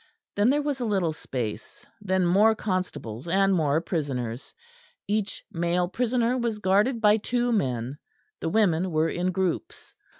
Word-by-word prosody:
Then 205 +4 +3
there 290 +2 +2
was 285 -2 -2
a 245 - -1
little 190 -7 0
space; 115 -7 -6
and 205 -3 -13
then 185 -1 +3
more 205 +6 +4
constables 180 - -4
and 195 +2 +3
more 155 -4 +2
prisoners. 130 -9 -4 0.5
Each 210 0 -2
male 175 +1 0
prisoner 245 +4 0
was 235 -3 -1
guarded 210 +5 +2
by 210 0 +5
two 245 +3 -1
men; 130 - -1 0.4
the 165 - -2
women 185 -3 +2
were 160 0 +1
in 180 +1 -1
groups. 185 -2 -3
190 Hz, 155 wpm, -26 LUFS, 160-220 Hz, 0.5 s, by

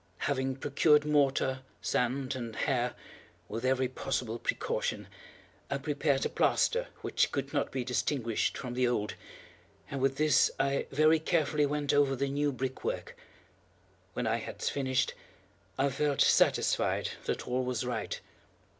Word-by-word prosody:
Having 130 -1 0
procured 150 +2 +3
mortar, 135 -3 +2 0.2
sand, 130 +5 0
and 115 -3 -5
hair, 125 -2 0 0.5
with 115 +5 -5
every 130 0 +2
possible 120 -2 -3
precaution, - - -2 0.6
I 140 - 0
prepared 145 -1 0
a - - 0
plaster - - +2 0.2
which - - +1
could - - -3
not - - 0
be 130 - -2
distinguished 120 -1 0
from 125 -2 -5
the 125 0 +2
old, 105 -3 -1 0.8
and 135 - -3
with 135 0 +1
this 155 -2 +4
I 140 0 +1
very 155 +3 +4
carefully 150 -2 +1
went 145 0 0
over 140 -2 +3
the 140 +2 -1
new 145 +1 +1
brickwork. 130 0 -4 1.0
When - - -2
I - - +1
had - - -7
finished, 130 -2 0 0.6
I 140 +1 +2
felt 140 +1 0
satisfied - - +3
that - - -2
all 125 +1 0
was 125 -1 -2
right. 115 -4 -3
135 Hz, 140 wpm, -31 LUFS, 125-145 Hz, 1.0 s, this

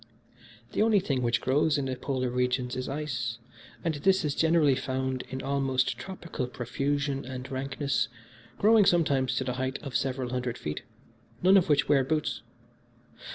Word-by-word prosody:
"The - - +1
only 215 -2 +5
thing 140 -8 -1
which 120 -2 +1
grows 150 +3 +2
in 140 - -1
the 130 -1 -2
Polar 130 -1 -2
regions 125 0 0
is 130 - -3
ice, 125 -6 -3 0.5
and 165 - 0
this 190 +5 +2
is 145 - 0
generally 160 -3 +4
found 130 0 -2
in 130 0 -5
almost 135 -2 +1
tropical 170 -8 -5
profusion 140 +3 -2
and 130 0 -7
rankness, 135 0 -1 0.5
growing 215 0 +5
sometimes 140 -8 +2
to 130 - 0
the 125 -1 -2
height 130 +1 -1
of 140 -4 -6
several 130 -2 -1
hundred 125 -1 -2
feet, 75 0 -4 0.6
none 190 +2 +7
of 180 -4 +4
which 145 -1 +3
wear 140 -2 +4
boots. 155 +3 -1
135 Hz, 160 wpm, -28 LUFS, 130-150 Hz, 0.6 s, none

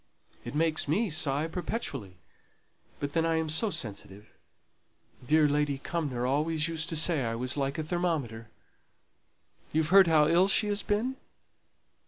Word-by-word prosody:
It - - -7
makes 160 0 +2
me 195 +7 0
sigh 150 -1 0
perpetually; 165 - -5 0.8
but 145 0 -4
then 165 - +1
I 165 0 +1
am 160 -1 -1
so 185 +8 0
sensitive. 105 - -6 0.9
Dear 150 +4 +3
Lady 145 -1 0
Cumnor 135 -5 -3
always 150 +4 0
used 165 -1 -2
to 165 - -2
say 160 -2 +1
I 115 -1 -2
was 125 +3 0
like 140 -1 -2
a 155 - -2
thermometer. 150 -10 -2 1.2
You've 155 0 0
heard 190 0 +7
how 155 -2 +4
ill 175 +4 +4
she 210 +1 +2
has 205 0 -1
been?" 235 +6 -1
155 Hz, 150 wpm, -29 LUFS, 140-170 Hz, 1.2 s, heard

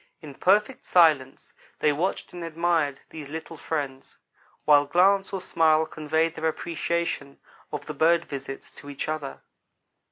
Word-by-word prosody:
In 150 -3 -10
perfect 210 - +2
silence 155 -7 +3 0.2
they 150 - +3
watched 175 +7 -2
and 175 -1 -7
admired 165 -3 0
these 150 -3 -8
little 160 +2 -7
friends, 140 -4 -5 0.5
while 145 -1 +5
glance 195 +5 +3
or 195 - -2
smile 160 -3 +3
conveyed 160 +1 -1
their 160 0 -2
appreciation 165 -3 -3 0.3
of - - -5
the - - -5
bird 170 +1 +3
visits 135 -1 -7
to 145 - -12
each 140 - -5
other. 155 -3 -4
160 Hz, 140 wpm, -26 LUFS, 145-170 Hz, 0.5 s, while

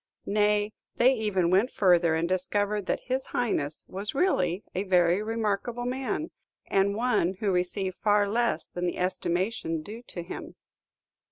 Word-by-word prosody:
Nay, 210 0 +2 0.2
they 255 +3 +5
even 200 -7 0
went 200 +7 +4
further, 175 -6 +3
and 165 +1 0
discovered 200 +2 0
that - - 0
his 260 +1 -2
Highness 155 -11 -1
was 200 +5 -1
really 190 - +1
a 185 - -1
very 180 -1 +3
remarkable 225 +2 -2
man, 265 +5 -2 0.3
and 195 +1 +2
one 225 -6 +1
who 200 0 -1
received 185 +1 -1
far 205 -1 +3
less 225 -6 0
than 180 0 -3
the 175 - -3
estimation 180 -2 -1
due 220 +7 -8
to 175 - -6
him. 170 - -8
200 Hz, 150 wpm, -27 LUFS, 180-225 Hz, 0.3 s, they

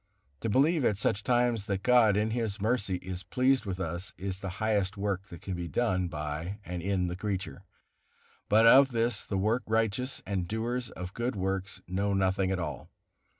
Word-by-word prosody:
To 115 - -2
believe 145 +7 +3
at 105 -4 +2
such 105 0 0
times 120 -3 +1
that 100 -1 -2
God, 120 -5 +5
in 110 +1 +1
His 110 -3 -1
mercy, 105 -3 0
is 90 -1 -5
pleased 130 +2 +1
with 95 -1 -3
us, 85 0 -4
is 95 0 -4
the 95 - -4
highest 105 -2 0
work 100 -1 -2
that 85 - -11
can 95 - -4
be 85 -1 -4
done 95 -4 0
by 80 +4 -4
and 90 0 -4
in 95 0 0
the 90 0 -3
creature; 95 -5 -4 0.8
but 110 +2 +6
of 135 +2 +7
this 115 -2 0
the 100 - -3
work 110 +6 +1
righteous 115 +4 0
and 95 -3 -2
doers 120 +3 -2
of 90 -1 -7
good 120 +1 -2
works 95 0 -3
know 100 +2 0
nothing 95 0 +1
at 95 - 0
all. 75 -7 -5
100 Hz, 190 wpm, -29 LUFS, 95-115 Hz, 0.8 s, of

